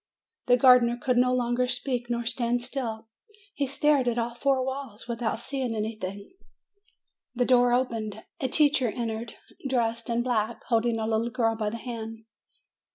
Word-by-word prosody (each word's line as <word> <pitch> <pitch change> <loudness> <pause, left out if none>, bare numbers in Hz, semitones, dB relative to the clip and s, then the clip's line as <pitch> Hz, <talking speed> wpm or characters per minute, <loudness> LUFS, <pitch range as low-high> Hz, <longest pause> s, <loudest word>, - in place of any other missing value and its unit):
The 245 0 +6
gardener 250 -2 +6
could 250 -1 +1
no 250 +1 +4
longer 250 0 +1
speak 245 -2 -2
nor 235 0 -1
stand 240 +1 0
still; 235 -4 -4 0.2
302 425 - -26
MAY - - -29
he 280 - -1
stared 280 -1 +2
at 240 0 +1
all 235 0 -1
four 260 +1 +1
walls, 265 -5 -6
without 235 -2 -2
seeing 250 0 -3
any 220 +1 -2
thing. 200 -1 -7 1.0
The 245 0 +2
door 245 -1 +4
opened; 230 -4 -1 0.2
a 265 - 0
teacher 280 -2 +3
entered, 225 0 -4 0.3
dressed 230 -2 0
in 235 0 +1
black, 235 -2 -1
holding 230 0 +2
a 220 - -2
little 225 +1 0
girl 230 -2 +1
by 215 -1 -1
the 230 - -5
hand. 225 -2 -7
240 Hz, 170 wpm, -27 LUFS, 225-255 Hz, 1.0 s, The